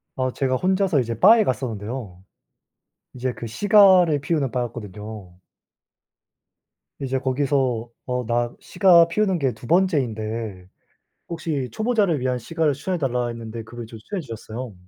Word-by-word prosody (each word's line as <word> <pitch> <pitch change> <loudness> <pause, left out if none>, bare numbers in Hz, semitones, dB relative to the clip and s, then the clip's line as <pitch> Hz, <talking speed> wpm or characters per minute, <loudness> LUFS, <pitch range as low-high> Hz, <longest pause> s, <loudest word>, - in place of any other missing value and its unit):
아 130 -1 -1
제가 130 -1 0
혼자서 185 0 +1
이제 115 -2 -2
바에 220 +3 +7
갔었는데요. 110 - -4 0.9
이제 130 0 -2
그 115 - -7
시가를 185 - +5
피우는 145 -3 -1
바였거든요. 105 -5 -6 1.6
이제 135 -1 -2
거기서 130 -3 0 0.2
어 125 -1 -2
나 120 0 0
시가 175 -3 +5
피우는 190 0 0
게 135 -5 0
2 115 - -13
번째인데 115 - 0 0.6
혹시 155 -6 -3
초보자를 215 - +1
위한 125 -1 0
시가를 160 +5 0
추천해 180 +6 -3
달라 125 -4 -1
했는데 115 -1 -6
그걸 120 +2 -8
이제 115 0 -11
추천해 185 - -5
주셨어요. 115 - -7
130 Hz, 305 characters per minute, -23 LUFS, 115-165 Hz, 1.6 s, 바에